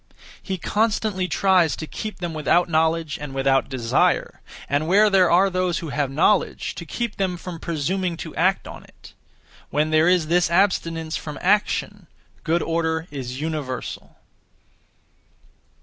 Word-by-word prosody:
He 190 -1 -4
constantly 210 -1 0
(tries 180 -6 +3
to) 160 - -6
keep 215 +6 -6
them 175 -2 -4
without 165 +3 +2
knowledge 160 -1 0
and 140 -2 -7
without 135 0 +2
desire, 120 -4 0 0.3
and 145 +3 0
where 205 +4 +4
there 185 -3 +5
are 185 +3 +5
those 185 -2 0
who 165 - -5
have 145 -1 -1
knowledge, 145 +6 +1
to - - -9
keep 235 -3 -4
them 185 -2 -1
from 170 -1 -8
presuming 170 +3 -2
to - - -8
act - - +1
(on - - -10
it). - - -17 0.6
When 155 +1 0
there 155 +1 +4
is 180 -3 +3
this 175 +2 +2
abstinence 165 -3 +1
from 150 -1 -7
action, 205 -1 0 0.4
good 170 +2 +1
order 165 -1 -1
is 130 -2 -6
universal. 150 -5 -5
165 Hz, 150 wpm, -22 LUFS, 155-185 Hz, 0.6 s, there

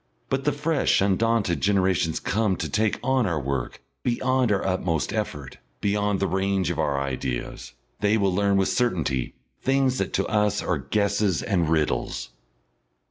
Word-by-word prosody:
But 135 0 -1
the 150 - +3
fresh 145 +1 +1
undaunted 100 -1 +1
generations 95 -4 +2
come 105 -1 0
to 80 - -3
take 105 +8 0
on 130 -4 +2
our 85 -4 0
work 70 -3 -4 0.2
beyond 125 0 +1
our 100 - +1
utmost 90 -7 -1
effort, 70 -3 -4 0.2
beyond 105 -1 0
the - - +1
range 95 -2 0
of 85 - -4
our 70 -3 +1
ideas. 65 -3 -4 0.3
They 105 +1 +2
will 100 -3 +1
learn 100 +1 +2
with 95 - +2
certainty 80 - 0 0.3
things 135 -1 +2
that 100 - -1
to 95 - +1
us 105 -2 +1
are - - 0
guesses 100 -3 0
and 85 -6 +1
riddles.... 75 -6 -1
100 Hz, 155 wpm, -25 LUFS, 85-110 Hz, 0.3 s, the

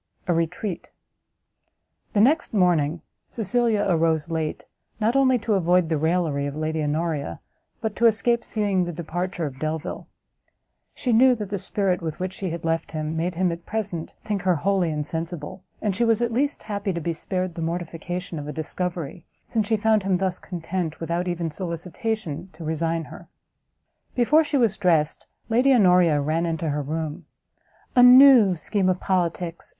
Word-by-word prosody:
A 175 - +3
RETREAT. 170 +3 -2 1.3
The 205 - +4
next 290 +2 +2
morning 170 -4 +2 0.2
Cecilia 225 -1 +1
arose 165 -2 +1
late, 160 -2 -2 0.4
not 225 +3 +1
only 260 -2 +4
to 225 -1 -1
avoid 180 -2 +3
the 160 - +1
raillery 160 -3 0
of 140 - -5
Lady 155 +1 -2
Honoria, 150 - -2 0.4
but 220 -2 -2
to 235 - +5
escape 235 +2 +2
seeing 200 -4 0
the 175 - -4
departure 175 +1 -3
of 135 -2 -6
Delvile; 155 +2 -4 0.9
she 245 - -1
knew 250 +3 +6
that 210 -3 -6
the 200 - -1
spirit 190 -1 0
with 160 -2 -5
which 185 +1 -3
she 195 -1 -4
had 165 0 -5
left 165 0 -1
him, 155 0 -3
made 170 +2 -2
him, 180 0 +1
at 170 0 -7
present, 200 -7 -4
think 205 -3 -1
her 180 -1 +2
wholly 185 +2 +1
insensible, 160 +3 -4 0.2
and 205 -3 0
she 235 - +1
was 225 -2 +3
at 235 -1 -1
least 280 +4 0
happy 200 -2 -3
to 170 - -3
be 170 +1 -2
spared 185 +2 -3
the 165 - -6
mortification 170 +1 -4
of 145 - -7
a - - -3
discovery, 170 +1 -4 0.2
since 220 -3 -1
she 220 0 +2
found 220 0 +3
him 190 -1 +1
thus 185 -1 -1
content, 170 -2 -4
without 170 +2 -2
even 170 -2 -2
solicitation, 180 +1 -4
to 160 +1 -10
resign 165 +1 -1
her. - - -12 0.9
Before 290 +6 +4
she 290 -1 -1
was 230 -6 +2
dressed, 165 -5 +1 0.2
Lady 245 +4 +3
Honoria 180 - +5
ran 160 +4 0
into 160 -1 -2
her 145 0 -1
room, 155 +1 -4 0.7
"A 250 - +7
new 250 -6 +8
scheme 185 +3 0
of 185 0 0
politics!" 175 -2 -2
180 Hz, 170 wpm, -24 LUFS, 160-210 Hz, 1.3 s, new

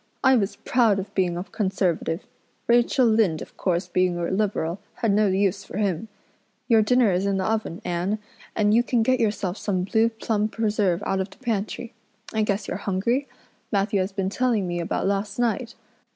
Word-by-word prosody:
I 265 -1 +6
was 205 -4 0
proud 230 -5 +2
of 195 +1 -5
being 180 -3 +1
a 175 - -3
Conservative. 190 -5 -1 0.4
Rachel 240 +2 +4
Lynde, 215 -8 +2
of - - -15
course, 180 -1 -1
being 180 -1 +1
a 170 +1 -2
Liberal, 190 -3 -1 0.2
had 225 - 0
no 210 +1 +3
use 195 +1 +1
for - - -8
him. 205 0 -1 0.6
Your 225 -3 +5
dinner 245 -1 +3
is 185 +2 0
in 195 -1 +1
the 190 - -1
oven, 220 -3 -2
Anne, 180 +4 -1 0.4
and 210 -1 +3
you 235 - +6
can 240 -1 +1
get 255 +2 +2
yourself 205 -4 0
some 185 -3 -1
blue 220 +4 +2
plum 220 -2 -1
preserve 210 -5 0
out 195 - 0
of 190 +1 -2
the - - -17
pantry. 230 0 -3 0.4
I 220 - +1
guess 205 -1 -1
you're - - -3
hungry. 210 +8 0 0.4
Matthew 200 -1 +1
has 190 +2 -1
been 195 -1 -2
telling 230 -5 +1
me 175 0 -2
about 170 - -2
last 200 +1 -1
night. 240 0 -1
205 Hz, 190 wpm, -24 LUFS, 190-225 Hz, 0.6 s, I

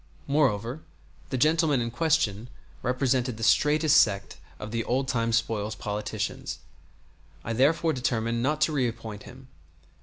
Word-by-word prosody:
Moreover, 130 -2 0 0.5
the 130 - -2
gentleman 155 0 +3
in 115 0 -2
question 120 -7 0 0.3
represented 125 -1 0
the 115 - -6
straitest 150 +5 +5
sect 100 -3 -1 0.2
of 105 - -7
the 115 0 -1
old 130 +3 -1
time 115 -3 0
spoils 110 -2 -1
politicians. 105 0 -4 0.9
I 115 - -3
therefore 155 +6 +2
determined 115 -2 -1
not 150 +4 0
to - - +3
reappoint 115 -6 -3
him. 130 +1 -14
125 Hz, 130 wpm, -27 LUFS, 115-145 Hz, 0.9 s, straitest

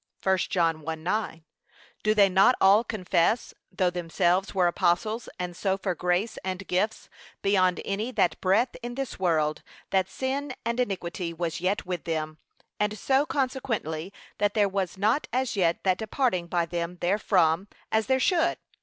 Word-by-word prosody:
(1 190 0 +4
John 165 -3 +1
1:9) 165 +3 -3 0.6
Do 215 0 +2
they 200 -2 +6
not 195 +6 +5
all 200 +4 +6
confess, 195 0 0 0.2
though 185 -1 +1
themselves 175 +2 0
were 185 -2 +3
apostles, 185 +6 +1
and 180 -1 -4
so 190 +1 0
for 190 -1 -2
grace 180 +6 -1
and 190 +1 -4
gifts 210 +5 -1 0.4
beyond 185 -2 +3
any 205 +4 -2
that 175 -9 +1
breathe 205 +7 +3
in 240 0 -5
this 270 -5 -4
world, 155 -4 +1 0.3
that 190 -1 +2
sin 265 +2 -3
and 235 +1 -1
iniquity 180 -5 -2
was 165 0 -3
yet 190 +2 0
with 180 -2 -4
them; 155 -1 -3 0.4
and 210 +1 0
so 270 +6 +2
consequently, 225 - -2 0.3
that 205 0 +1
there 205 -2 +4
was 190 -2 -2
not 220 +9 +1
as 255 0 -1
yet 175 -4 +1
that 185 -1 +2
departing 220 -5 0
by 170 -1 0
them 170 +1 -4
therefrom, 180 -1 +2 0.2
as 220 0 +1
there 260 0 +3
should. 340 +3 +2
190 Hz, 160 wpm, -27 LUFS, 175-220 Hz, 0.6 s, they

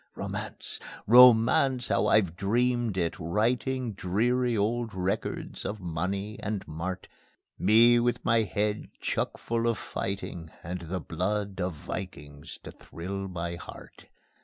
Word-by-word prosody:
Romance! - - -6 0.3
Romance! 125 +2 +6
How - - +2
I've 95 -6 +3
dreamed 120 +2 +1
it, 85 -2 -1
writing 115 +7 0
Dreary 115 +6 +1
old 115 +1 -1
records 95 +1 -3
of 105 - -4
money 95 +4 -3
and 100 -2 -4
mart, 90 +4 -5 0.5
Me 120 +3 +6
with 120 0 0
my 115 0 +4
head 105 0 -1
chuckful 115 0 -1
of 115 -2 +1
fighting 90 -5 -5
And 90 +2 -4
the 90 +2 -4
blood 95 +4 -2
of 90 -2 -2
vikings 75 -3 -7
to - - -8
thrill 95 +3 -6
my 85 -1 -4
heart. - - -12
100 Hz, 125 wpm, -28 LUFS, 90-115 Hz, 0.5 s, Romance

